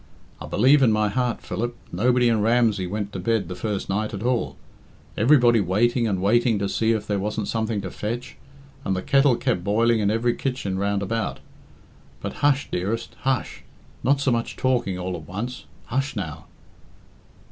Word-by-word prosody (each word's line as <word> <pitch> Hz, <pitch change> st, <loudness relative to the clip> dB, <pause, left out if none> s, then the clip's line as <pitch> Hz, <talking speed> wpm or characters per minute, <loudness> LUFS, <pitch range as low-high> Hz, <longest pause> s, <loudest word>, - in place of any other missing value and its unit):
I -, -, -6 dB
believe 135 Hz, +6 st, +4 dB
in 125 Hz, -4 st, +5 dB
my 105 Hz, -1 st, +2 dB
heart, 125 Hz, +2 st, -1 dB
Philip, 120 Hz, +1 st, -3 dB, 0.2 s
nobody 125 Hz, +6 st, +3 dB
in 115 Hz, -2 st, +2 dB
Ramsey 110 Hz, -4 st, +2 dB
went 105 Hz, +1 st, -4 dB
to 95 Hz, -, -4 dB
bed 105 Hz, 0 st, 0 dB
the 90 Hz, -, -5 dB
first 100 Hz, +2 st, -3 dB
night 105 Hz, +2 st, -1 dB
at 100 Hz, -, -6 dB
all. 125 Hz, -1 st, 0 dB, 0.6 s
Everybody 120 Hz, -2 st, +5 dB
waiting 115 Hz, +6 st, +2 dB
and 95 Hz, -3 st, -1 dB
waiting 120 Hz, +2 st, +3 dB
to 100 Hz, 0 st, -1 dB
see 110 Hz, +3 st, +1 dB
if 110 Hz, -2 st, -2 dB
there 105 Hz, -2 st, -1 dB
wasn't 105 Hz, +1 st, -2 dB
something 110 Hz, -2 st, -1 dB
to 95 Hz, -2 st, -6 dB
fetch, 120 Hz, +4 st, -5 dB, 0.5 s
and 95 Hz, -, 0 dB
the 95 Hz, -, -3 dB
kettle 140 Hz, -2 st, +4 dB
kept 115 Hz, -8 st, -1 dB
boiling 115 Hz, +3 st, +2 dB
in 100 Hz, -1 st, +2 dB
every 115 Hz, +3 st, +1 dB
kitchen 120 Hz, -9 st, -3 dB
round 100 Hz, 0 st, 0 dB
about. 115 Hz, +2 st, -2 dB, 0.8 s
But -, -, -5 dB
hush, 145 Hz, -1 st, +3 dB
dearest, 105 Hz, +6 st, -2 dB
hush! 130 Hz, -1 st, -1 dB, 0.4 s
Not 140 Hz, +2 st, +3 dB
so 140 Hz, -2 st, +1 dB
much 115 Hz, -1 st, -1 dB
talking 120 Hz, -8 st, 0 dB
all 90 Hz, 0 st, -3 dB
at 80 Hz, -2 st, -9 dB
once. 115 Hz, +7 st, -5 dB, 0.2 s
Hush, 135 Hz, +2 st, -1 dB
now!" 80 Hz, -7 st, -5 dB
110 Hz, 180 wpm, -24 LUFS, 100-120 Hz, 0.8 s, in